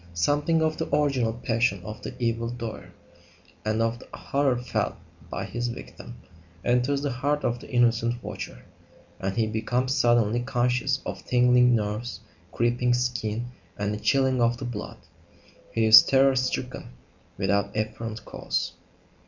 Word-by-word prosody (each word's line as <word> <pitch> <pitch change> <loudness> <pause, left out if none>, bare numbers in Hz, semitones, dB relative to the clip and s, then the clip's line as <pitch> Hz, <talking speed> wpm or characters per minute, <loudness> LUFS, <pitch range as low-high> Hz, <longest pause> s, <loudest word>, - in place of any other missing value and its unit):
Something 145 - +2
of 155 0 0
the - - -3
original 135 -6 +1
passion 115 -4 0
of 105 +2 -8
the - - -7
evil 115 -1 -1
doer, 120 -2 -6 0.7
and 110 +1 +1
of 115 +1 -1
the - - -14
horror 135 -3 +1
felt 125 - -2 0.3
by - - -4
his 120 0 -3
victim, 120 0 -8 0.5
enters 125 +4 +1
the 145 - 0
heart 145 +4 -1
of 120 0 0
the - - -12
innocent 120 -1 +2
watcher, - - -7 0.5
and 95 +3 -3
he 115 - +3
becomes 120 +4 -1
suddenly 120 -3 +3
conscious 125 +2 0
of - - -5
tingling 125 0 +5
nerves, 105 -1 -3 0.3
creeping 120 +1 +1
skin, 120 -1 -2 0.3
and 105 +1 -1
a 105 - -4
chilling 130 0 +2
of 120 0 +2
the 130 - -6
blood. 120 -4 -6 0.7
He 115 -1 +1
is 110 0 +11
terror 135 0 +4
stricken 125 - -2 0.4
without 100 +1 0
apparent 110 +1 -4
cause. - - -3
120 Hz, 145 wpm, -26 LUFS, 115-125 Hz, 0.7 s, is